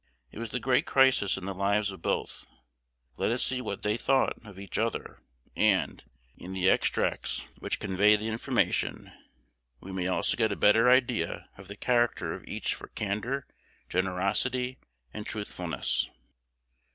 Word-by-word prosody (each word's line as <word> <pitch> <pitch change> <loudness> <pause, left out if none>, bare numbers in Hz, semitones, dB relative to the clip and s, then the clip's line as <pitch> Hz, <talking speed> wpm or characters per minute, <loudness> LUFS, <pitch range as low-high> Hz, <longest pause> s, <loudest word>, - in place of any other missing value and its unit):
It - - -9
was 115 -1 -4
the 125 - -2
great 125 0 +2
crisis 130 -8 +4
in 95 - -6
the 100 - -3
lives 100 +2 +1
of 95 - -11
both. - - -2 0.7
Let - - +1
us 120 - +1
see 130 -1 +1
what 100 -5 -5
they 105 +1 +1
thought 135 0 +1
of 100 -4 -12
each 100 -2 -4
other; - - -2 0.4
and, 100 -3 +2 0.3
in 90 +2 -8
the 95 0 +3
extracts - - 0
which - - -2
convey 100 +2 +4
the 105 +1 -3
information, 110 +1 0 0.7
we 95 - -9
may 95 -1 -2
also 95 - +1
get 110 -3 +2
a - - -1
better 115 +5 +5
idea 125 -8 +2
of 95 -1 -13
the 100 +1 -9
character 120 0 +1
of - - -8
each - - -2
for - - -9
candor, 110 +7 -2 0.4
generosity, 100 +8 0 0.3
and 105 - -5
truthfulness. 90 - -2
105 Hz, 155 wpm, -29 LUFS, 95-120 Hz, 0.7 s, better